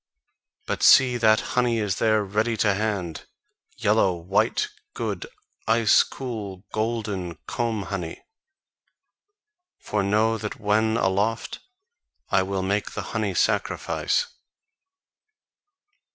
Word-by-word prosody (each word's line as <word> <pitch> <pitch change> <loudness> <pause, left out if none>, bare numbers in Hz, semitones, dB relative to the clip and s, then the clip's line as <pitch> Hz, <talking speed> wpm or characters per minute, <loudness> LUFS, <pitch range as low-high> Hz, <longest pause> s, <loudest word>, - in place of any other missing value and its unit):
But - - -3
see 125 -2 +6
that 110 -2 +4
honey 125 -2 +2
is 105 -3 -1
there 110 -1 +2
ready 110 +3 -1
to 105 -1 +3
hand, 100 -5 -3 0.5
yellow, 95 -2 +2
white, 95 - 0 0.3
good, - - -3 0.4
ice 115 -1 +5
cool, 105 -8 -6
golden 105 -6 -2
comb 115 -4 -2
honey. 90 -2 -5 1.5
For 105 - -2
know 110 +3 +2
that 105 0 -5
when 110 +2 +2
aloft 105 +3 0 0.7
I 95 - +4
will 95 0 -2
make 100 +2 -1
the - - -4
honey 105 -4 -1
sacrifice." 485 - 0
105 Hz, 105 wpm, -24 LUFS, 95-115 Hz, 1.5 s, see